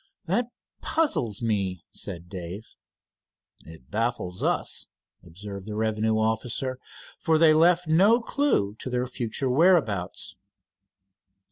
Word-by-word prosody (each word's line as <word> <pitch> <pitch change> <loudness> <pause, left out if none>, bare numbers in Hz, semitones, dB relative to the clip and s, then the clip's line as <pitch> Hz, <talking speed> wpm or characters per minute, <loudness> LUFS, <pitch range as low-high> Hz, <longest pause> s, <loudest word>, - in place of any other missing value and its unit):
"That 240 -1 0 0.3
puzzles 125 - 0
me," 100 -5 -1
said 85 0 -6
Dave. 95 +3 -7 1.0
"It 80 -6 -14
baffles 110 -5 -2
us," - - 0 0.4
observed 100 +3 -9
the 105 - -5
revenue 110 0 +1
officer, 115 +4 -1 0.4
"for 160 -1 +2
they 160 0 +6
have 155 - +5
left 175 +1 +4
no 195 +9 +5
clew 240 - 0
to - - -5
their 125 0 0
future 125 0 -3
whereabouts." 130 - +2
110 Hz, 115 wpm, -26 LUFS, 100-155 Hz, 1.0 s, they